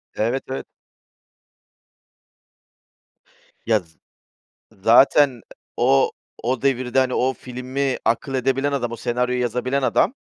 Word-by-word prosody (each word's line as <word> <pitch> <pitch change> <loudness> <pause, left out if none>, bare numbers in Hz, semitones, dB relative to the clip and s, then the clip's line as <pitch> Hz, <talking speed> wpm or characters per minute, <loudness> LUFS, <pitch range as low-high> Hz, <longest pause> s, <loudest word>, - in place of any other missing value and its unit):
Evet, 120 +5 -1
evet. 135 - -5 3.0
Ya, 110 -1 +3
z 80 -4 -21 0.8
zaten, 120 +7 +5
ııı, 120 -3 -14 0.3
o 135 +3 +3 0.3
o 125 0 -1
devirde, 130 -2 0
hani, 130 -1 +2
o 130 +1 +1
filmi 130 +2 -3
akıl 120 +4 0
edebilen 135 +2 0
adam, 120 -4 -2
o - - -4
senaryoyu 125 +2 -1
yazabilen 125 +3 -1
adam 130 - +2
125 Hz, 110 wpm, -22 LUFS, 120-135 Hz, 3.0 s, zaten